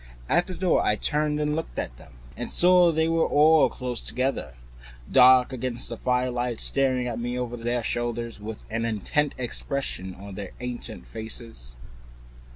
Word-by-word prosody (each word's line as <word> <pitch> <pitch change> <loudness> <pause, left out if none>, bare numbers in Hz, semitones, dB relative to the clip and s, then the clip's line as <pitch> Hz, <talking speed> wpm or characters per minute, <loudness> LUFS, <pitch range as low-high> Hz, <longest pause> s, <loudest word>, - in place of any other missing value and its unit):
At 175 - +2
the 185 - -6
door 185 -2 +2
I 105 - +2
turned 150 +5 0
and 150 0 0
looked 160 - -5
at - - -4
them, - - -16 0.2
and - - -5
saw 180 -1 +6
they 160 0 +1
were 165 0 +2
all 155 +1 +5
close 125 -2 -4
together, 130 - -2 0.6
dark 130 0 +6
against 125 -1 -2
the 120 - -4
firelight, 125 -1 -1
staring 130 -2 +2
at 120 -1 -3
me 120 +1 -3
over 125 -1 -3
their 120 0 -2
shoulders, 120 -1 -3
with 105 +1 -7
an 115 +1 -1
intent 115 +7 0
expression 120 -6 -3
on 100 +1 -10
their 100 -1 -7
ancient 125 - -6
faces. 110 - -4
125 Hz, 165 wpm, -26 LUFS, 115-145 Hz, 0.6 s, saw